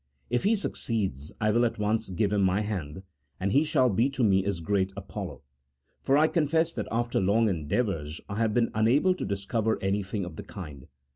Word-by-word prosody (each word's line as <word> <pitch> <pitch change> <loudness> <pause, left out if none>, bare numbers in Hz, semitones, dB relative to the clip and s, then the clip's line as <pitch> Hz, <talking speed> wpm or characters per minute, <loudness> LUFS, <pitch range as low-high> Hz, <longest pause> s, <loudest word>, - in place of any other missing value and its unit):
1 125 - +2
If - - -3
he 220 +3 +4
succeeds, 100 - -2
I 110 -1 +2
will 120 +3 +3
at 120 - 0
once 110 0 0
give 100 +3 0
him 105 - +2
my 95 +2 +2
hand, 95 -5 -4 0.4
and 95 +1 0
he 140 +8 +4
shall 130 -4 +3
be 115 +4 +2
to 135 -2 -2
me 95 -3 +4
as 100 -4 -1
great 95 +3 0
Apollo; 100 -6 -7 0.6
for 135 - +3
I 155 +1 +5
confess 160 +1 +1
that - - -4
after 120 +1 0
long 105 +4 +3
endeavours 80 -2 -1
I 100 - -5
have 115 -1 +2
been 120 -1 +2
unable 120 +12 +3
to 180 - -5
discover 110 +3 -1
anything 95 0 -1
of 85 -3 -9
the - - -6
kind. 75 -9 -9
105 Hz, 205 wpm, -28 LUFS, 95-120 Hz, 0.6 s, I